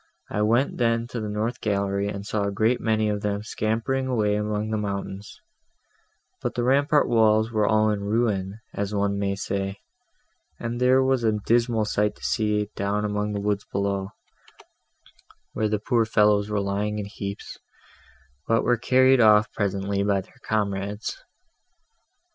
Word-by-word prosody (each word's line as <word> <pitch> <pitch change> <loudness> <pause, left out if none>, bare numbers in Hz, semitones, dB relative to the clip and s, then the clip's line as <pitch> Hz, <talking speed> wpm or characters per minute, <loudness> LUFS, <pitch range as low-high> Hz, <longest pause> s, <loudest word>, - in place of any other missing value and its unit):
I 105 - -1
went 120 +7 +1
then 115 -1 +1
to 120 - -4
the 105 - -4
north 110 +4 -2
gallery, 100 -1 0
and 100 0 -5
saw 105 -1 -1
a 100 - -1
great 110 +5 +1
many 110 -1 +1
of 105 -1 -1
them 105 0 -2
scampering 115 +5 -1
away 110 -5 +1
among 105 +1 -2
the 110 - 0
mountains; 100 -1 -5 1.0
but - - -3
the 120 - 0
rampart 140 +3 +3
walls 110 -1 +3
were 105 -2 +1
all 110 0 +3
in 105 - -1
ruins, 100 -3 0 0.2
as 100 +1 -3
one 100 0 0
may 100 -1 0
say, 100 0 -3 0.8
and 120 +1 -4
there 130 +1 +5
was 130 -2 +1
a 110 -1 +3
dismal 115 -2 +2
sight 105 0 0
to - - -18
see 105 -1 0
down 100 +1 -1
among 105 0 -2
the 100 - -2
woods 105 0 -1
below, 100 -1 -1 1.4
where 110 -1 0
the 105 - +1
poor 115 +3 +1
fellows 105 -2 +3
were 105 -1 0
lying 100 +2 -2
in 105 - -3
heaps, 100 -1 -7 0.9
but 115 0 +2
were 120 - +2
carried 130 +2 +4
off 105 -1 +5
presently 100 -1 -1
by 100 -1 +1
their - - -21
comrades. 100 0 -2
105 Hz, 160 wpm, -25 LUFS, 100-115 Hz, 1.4 s, there